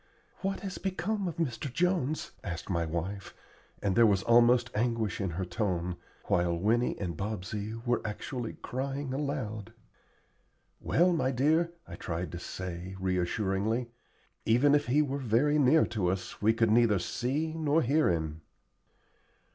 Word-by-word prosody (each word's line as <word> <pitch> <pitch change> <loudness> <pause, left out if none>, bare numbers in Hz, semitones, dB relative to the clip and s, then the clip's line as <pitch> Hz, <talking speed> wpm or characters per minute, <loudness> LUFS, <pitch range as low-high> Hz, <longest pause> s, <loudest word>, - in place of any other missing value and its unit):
"What 195 0 -2
has 195 -2 -5
become 195 +1 -2
of 170 - -4
Mr. 140 -4 -2
Jones?" 170 -2 0
asked 85 -3 -5
my 85 -2 +1
wife, 90 +5 -4 0.5
and 100 -2 +1
there 115 -1 +7
was 100 -2 +2
almost 120 +1 +5
anguish 115 -3 0
in 95 - -1
her 90 +2 -3
tone, 90 -2 -2 0.3
while 85 -1 +1
Winnie 115 +7 +1
and 90 -5 -3
Bobsey 105 +2 -4
were 120 0 +1
actually 115 +3 -4
crying 135 +1 -3
aloud. 130 -8 -3 1.1
"Well, 175 +4 +3
my 160 -6 +1
dear," 155 +6 +2
I - - -8
tried 85 +1 -4
to 85 - -6
say, 90 +1 -6
reassuringly, 95 +5 0 0.5
"even 125 +6 +4
if 145 -3 +3
he 145 +5 +4
were 140 -1 -3
very 135 +5 +2
near 145 +3 +5
to 100 -5 0
us 95 +1 -3
we 110 +2 +5
could 115 -1 +2
neither 115 -2 +5
see 135 - -2
nor 160 0 +2
hear 145 +2 +3
him." 80 -2 -2
115 Hz, 145 wpm, -30 LUFS, 95-140 Hz, 1.1 s, there